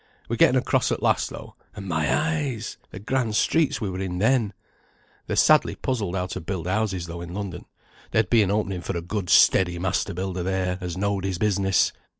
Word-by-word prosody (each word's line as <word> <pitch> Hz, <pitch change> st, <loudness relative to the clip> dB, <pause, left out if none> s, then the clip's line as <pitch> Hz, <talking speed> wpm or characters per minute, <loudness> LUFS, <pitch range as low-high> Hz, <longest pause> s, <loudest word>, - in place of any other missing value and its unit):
We -, -, -2 dB
getten -, -, +5 dB
across -, -, +1 dB
at -, -, -2 dB
last -, -, +2 dB
though, -, -, -10 dB, 0.2 s
and 100 Hz, -1 st, -7 dB
my 80 Hz, -3 st, 0 dB
eyes! 145 Hz, -8 st, -1 dB
the -, -, -9 dB
grand 110 Hz, +2 st, -1 dB
streets 160 Hz, +6 st, +2 dB
we 110 Hz, -, -2 dB
were 90 Hz, -, -5 dB
in 95 Hz, -2 st, -3 dB
then! 110 Hz, 0 st, +2 dB, 0.7 s
They're -, -, -1 dB
sadly -, -, +4 dB
puzzled 105 Hz, -8 st, -2 dB
how 90 Hz, -1 st, -1 dB
to 90 Hz, -, -5 dB
build 85 Hz, 0 st, -4 dB
houses 95 Hz, -2 st, -1 dB
though 85 Hz, 0 st, -7 dB
in 85 Hz, +1 st, -7 dB
London; 100 Hz, -4 st, -5 dB, 0.4 s
there'd 110 Hz, -3 st, +2 dB
be 115 Hz, -, +6 dB
an 100 Hz, -, +1 dB
opening 100 Hz, -3 st, -1 dB
for 85 Hz, -, -3 dB
a -, -, -3 dB
good 95 Hz, 0 st, -4 dB
steady 90 Hz, -2 st, +5 dB
master 90 Hz, -1 st, -1 dB
builder 95 Hz, 0 st, -3 dB
there, 90 Hz, 0 st, -1 dB
as 90 Hz, -1 st, -4 dB
know'd 100 Hz, -1 st, -1 dB
his 95 Hz, -2 st, -2 dB
business. 95 Hz, -1 st, +2 dB
95 Hz, 200 wpm, -24 LUFS, 90-105 Hz, 0.7 s, be